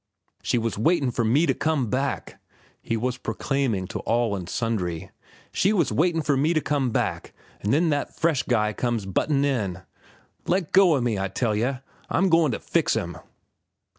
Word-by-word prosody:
"She -, -, 0 dB
was 115 Hz, -3 st, -2 dB
waitin' 140 Hz, 0 st, +2 dB
for 120 Hz, -, -1 dB
me 130 Hz, +9 st, +3 dB
to -, -, +2 dB
come 155 Hz, -6 st, 0 dB
back!" 135 Hz, +1 st, -2 dB, 0.4 s
he 115 Hz, -, -2 dB
was 125 Hz, +2 st, -2 dB
proclaiming 115 Hz, -4 st, -1 dB
to -, -, -4 dB
all 115 Hz, -2 st, 0 dB
and 90 Hz, -2 st, -6 dB
sundry. 95 Hz, -8 st, -2 dB, 0.4 s
"She 200 Hz, -, +2 dB
was 170 Hz, -8 st, +1 dB
waitin' 165 Hz, 0 st, +1 dB
for 145 Hz, -, +2 dB
me 155 Hz, +5 st, +2 dB
to -, -, +4 dB
come 145 Hz, -4 st, 0 dB
back, -, -, -2 dB, 0.3 s
an' 100 Hz, -, -2 dB
then 160 Hz, +8 st, +3 dB
that 145 Hz, -1 st, -3 dB
fresh 160 Hz, -5 st, +2 dB
guy 110 Hz, -3 st, +1 dB
comes 120 Hz, -3 st, -1 dB
buttin' 140 Hz, -, +1 dB
in. 100 Hz, -10 st, -1 dB, 0.6 s
Let 180 Hz, -2 st, 0 dB
go 185 Hz, -4 st, +6 dB
o' 135 Hz, -, 0 dB
me, 115 Hz, -4 st, 0 dB
I 95 Hz, -, -1 dB
tell 105 Hz, +3 st, -1 dB
yeh. 125 Hz, +4 st, -1 dB, 0.3 s
I'm 190 Hz, +2 st, +2 dB
goin' 165 Hz, -4 st, +4 dB
to -, -, -3 dB
fix -, -, +1 dB
'm." -, -, -3 dB
130 Hz, 185 wpm, -25 LUFS, 110-155 Hz, 0.6 s, go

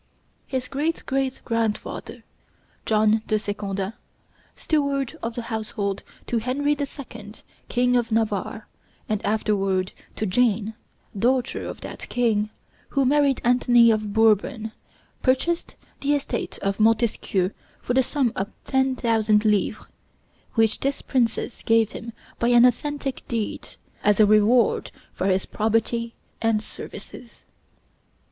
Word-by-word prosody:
His 260 Hz, -1 st, -2 dB
great 300 Hz, +5 st, -2 dB
great 270 Hz, -1 st, -1 dB
grandfather, 230 Hz, -2 st, -2 dB, 0.6 s
John 215 Hz, 0 st, +3 dB
de 215 Hz, -, +2 dB
Secondat, 205 Hz, -1 st, -3 dB, 0.6 s
steward 280 Hz, -4 st, 0 dB
of 230 Hz, 0 st, -4 dB
the 240 Hz, -, -3 dB
household 210 Hz, -3 st, -2 dB, 0.2 s
to 235 Hz, -, 0 dB
Henry 275 Hz, +5 st, 0 dB
the 285 Hz, -1 st, -2 dB
Second, 225 Hz, -7 st, -10 dB, 0.3 s
King 250 Hz, 0 st, +2 dB
of 235 Hz, -2 st, +1 dB
Navarre, 215 Hz, -1 st, -1 dB, 0.4 s
and 215 Hz, -2 st, -1 dB
afterward 195 Hz, -3 st, +1 dB, 0.2 s
to 215 Hz, -, -2 dB
Jane, 220 Hz, 0 st, +1 dB, 0.4 s
daughter 245 Hz, +4 st, +1 dB
of -, -, -7 dB
that -, -, -8 dB
king, 220 Hz, -4 st, +1 dB, 0.4 s
who 275 Hz, -2 st, +1 dB
married 280 Hz, 0 st, +3 dB
Antony 240 Hz, -1 st, +5 dB
of 215 Hz, -1 st, -1 dB
Bourbon, 220 Hz, +1 st, +2 dB, 0.5 s
purchased 310 Hz, +6 st, +1 dB, 0.2 s
the 285 Hz, +1 st, +2 dB
estate 270 Hz, -4 st, -3 dB
of 195 Hz, +1 st, -1 dB
Montesquieu 215 Hz, -4 st, +2 dB, 0.3 s
for 245 Hz, -, -2 dB
the 265 Hz, -, +5 dB
sum 260 Hz, -2 st, 0 dB
of 195 Hz, +2 st, -2 dB, 0.2 s
ten 265 Hz, -1 st, +2 dB
thousand 220 Hz, -3 st, +2 dB
livres, 210 Hz, -2 st, +1 dB, 0.7 s
which 225 Hz, -2 st, +3 dB
this 275 Hz, +1 st, -2 dB
princess 240 Hz, -1 st, 0 dB
gave 225 Hz, -1 st, +3 dB
him 235 Hz, -, -7 dB, 0.3 s
by 235 Hz, -, +2 dB
an 240 Hz, 0 st, +7 dB
authentic 275 Hz, +2 st, 0 dB
deed, 225 Hz, -3 st, -3 dB, 0.3 s
as 210 Hz, 0 st, +3 dB
a 215 Hz, -, +8 dB
reward 215 Hz, +3 st, +4 dB, 0.2 s
for 185 Hz, -, -1 dB
his 190 Hz, 0 st, +2 dB
probity 225 Hz, +2 st, 0 dB, 0.3 s
and 225 Hz, -2 st, +2 dB
services. 235 Hz, +1 st, -9 dB
230 Hz, 125 wpm, -24 LUFS, 215-255 Hz, 0.7 s, a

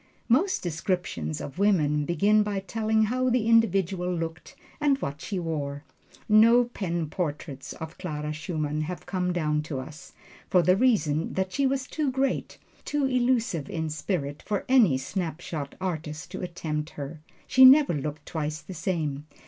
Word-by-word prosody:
Most 325 Hz, +11 st, +2 dB
descriptions 160 Hz, -, -2 dB
of 145 Hz, +6 st, -7 dB
women 150 Hz, -8 st, +2 dB
begin 200 Hz, +7 st, +3 dB
by 205 Hz, -1 st, -1 dB
telling 220 Hz, +2 st, +1 dB
how 255 Hz, +4 st, +1 dB
the 245 Hz, -2 st, +1 dB
individual 195 Hz, -6 st, +2 dB
looked 165 Hz, +8 st, -5 dB, 0.2 s
and 290 Hz, -2 st, +3 dB
what 145 Hz, -, -5 dB
she 200 Hz, -, -4 dB
wore. 145 Hz, -4 st, -3 dB, 0.4 s
No 230 Hz, +3 st, +6 dB
pen 175 Hz, -9 st, -3 dB
portraits 145 Hz, -4 st, -4 dB
of 160 Hz, +1 st, -9 dB
Clara 150 Hz, -4 st, -4 dB
Schumann 155 Hz, -1 st, -3 dB
have 175 Hz, +3 st, -5 dB
come 180 Hz, -2 st, -1 dB
down 150 Hz, -3 st, 0 dB
to 150 Hz, -3 st, -5 dB
us, 150 Hz, +5 st, -10 dB, 0.4 s
for 180 Hz, -2 st, +4 dB
the 180 Hz, +1 st, +4 dB
reason 190 Hz, -, +2 dB
that 190 Hz, 0 st, -1 dB
she 280 Hz, -1 st, +2 dB
was 265 Hz, 0 st, -1 dB
too 300 Hz, +1 st, -1 dB
great, 265 Hz, 0 st, -1 dB, 0.3 s
too 290 Hz, -2 st, 0 dB
elusive 240 Hz, -, +1 dB
in 160 Hz, -4 st, -3 dB
spirit, 150 Hz, -3 st, -3 dB
for 205 Hz, -2 st, -2 dB
any 230 Hz, -, +5 dB
snapshot 160 Hz, -1 st, -4 dB
artist 160 Hz, -4 st, -4 dB
to -, -, -5 dB
attempt 160 Hz, -4 st, -3 dB
her. 145 Hz, +2 st, -6 dB, 0.2 s
She 260 Hz, -, +5 dB
never 275 Hz, -, +8 dB
looked 150 Hz, 0 st, -4 dB
twice 155 Hz, -1 st, -3 dB
the 190 Hz, -, -10 dB
same. 155 Hz, -5 st, -2 dB
175 Hz, 155 wpm, -27 LUFS, 150-220 Hz, 0.4 s, never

